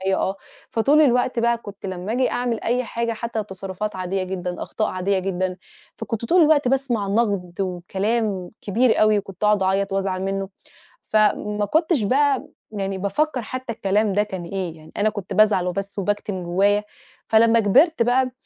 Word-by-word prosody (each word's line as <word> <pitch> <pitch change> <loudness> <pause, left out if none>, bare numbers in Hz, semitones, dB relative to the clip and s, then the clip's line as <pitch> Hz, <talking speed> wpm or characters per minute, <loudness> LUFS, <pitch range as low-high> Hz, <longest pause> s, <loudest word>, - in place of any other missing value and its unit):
آه، 190 +1 -1 0.3
فطول 280 +7 +3
الوقت 250 -3 +2
بقى 235 0 +2
كنت 205 -3 -10
لما 185 +2 -4
آجي 255 +1 +1
أعمل 245 -2 -1
أي 250 +2 +1
حاجة 235 -1 -2
حتى 225 -1 -3
تصرفات 195 +1 -5
عاديّة 185 +1 -2
جدًا، 180 -1 -4
أخطاء 215 - -2
عاديّة 190 +1 0
جدًا، 185 -1 -2 0.4
فكنت 225 0 -4
طول 355 +9 +4
الوقت 300 -4 +4
باسمع 245 -6 0
نقد 200 -4 0
وكلام 190 +2 -2
كبير 225 +4 +2
أوي، 215 -1 +5
وكنت 195 -1 -6
اقعد 210 -2 +3
أعيّط 195 +1 0
وأزعل 190 -1 -1
منه، 195 0 -2 0.6
فما 210 -1 +2
كنتش 315 - +1
بقى 275 +5 +2 0.2
يعني 195 -2 -3
بافكّر 250 +9 -1
حتى 255 +1 -5
الكلام 205 0 +1
ده 205 +2 +3
كان 190 -4 -6
إيه، 180 -2 -4
يعني 155 0 -15
أنا 210 +1 +2
كنت 205 -2 -6
بازعل 200 -3 +4
وبس 195 +2 -4
وباكتِم 205 -2 -2
جوّايا. 200 +4 +2 0.4
فلمّا 230 +1 +5
كبرت 265 - +4
بقى 255 +2 +2
205 Hz, 165 wpm, -22 LUFS, 190-235 Hz, 0.6 s, أوي